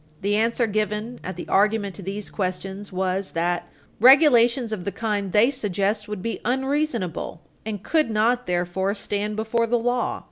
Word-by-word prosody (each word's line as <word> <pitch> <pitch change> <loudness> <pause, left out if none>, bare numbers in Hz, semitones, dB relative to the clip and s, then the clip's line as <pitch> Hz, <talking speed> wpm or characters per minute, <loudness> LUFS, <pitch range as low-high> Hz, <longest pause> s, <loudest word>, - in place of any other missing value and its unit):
The 205 +1 +1
answer 230 +2 +2
given 215 +2 -2
at 185 - -5
the 175 - -7
argument 205 0 +2
to 200 - -9
these 195 +2 -5
questions 195 +1 -4
was 190 +1 -2
that 175 +1 -1 0.3
regulations 245 -2 +6
of 205 -5 -4
the 200 - -3
kind 205 -1 -2
they 220 +7 +4
suggest 210 -3 -1
would 210 -3 -5
be 230 - -3
unreasonable, 260 - -1 0.3
and 210 -3 -4
could 310 -5 +2
not, 230 +3 +1
therefore, 180 +3 -1
stand 205 +1 -3
before 225 +2 0
the 240 +1 +2
law. 245 +1 -1
210 Hz, 165 wpm, -24 LUFS, 195-235 Hz, 0.3 s, regulations